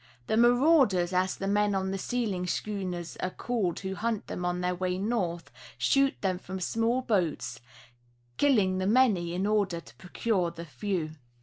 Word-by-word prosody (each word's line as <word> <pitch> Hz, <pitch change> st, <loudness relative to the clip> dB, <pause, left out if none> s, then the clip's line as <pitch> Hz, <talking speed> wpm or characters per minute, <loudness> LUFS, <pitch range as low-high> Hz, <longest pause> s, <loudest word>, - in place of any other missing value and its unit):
The 220 Hz, -, 0 dB
"marauders," 240 Hz, -, +4 dB
as 185 Hz, +1 st, +1 dB
the 195 Hz, -, -4 dB
men 205 Hz, 0 st, +2 dB
on 190 Hz, 0 st, -1 dB
the 195 Hz, -, -3 dB
sealing 205 Hz, -6 st, -2 dB
schooners 180 Hz, -4 st, -3 dB
are 185 Hz, -, -2 dB
called 200 Hz, -4 st, -2 dB
who 190 Hz, -1 st, -3 dB
hunt 220 Hz, +2 st, -2 dB
them 180 Hz, -, -5 dB
on 180 Hz, 0 st, -1 dB
their 180 Hz, 0 st, 0 dB
way 180 Hz, 0 st, -2 dB
north, 190 Hz, -5 st, -2 dB, 0.3 s
shoot 275 Hz, 0 st, +3 dB
them 185 Hz, -2 st, 0 dB
from 190 Hz, 0 st, -6 dB
small 230 Hz, +7 st, 0 dB
boats, 190 Hz, -10 st, -1 dB, 0.8 s
killing 205 Hz, -10 st, +3 dB
the 185 Hz, -, 0 dB
many 205 Hz, -8 st, +3 dB
in 185 Hz, +2 st, 0 dB
order 205 Hz, -5 st, +1 dB
to -, -, -16 dB
procure 185 Hz, -1 st, -1 dB
the 170 Hz, 0 st, -8 dB
few. 160 Hz, +3 st, -3 dB
190 Hz, 170 wpm, -29 LUFS, 180-225 Hz, 0.8 s, marauders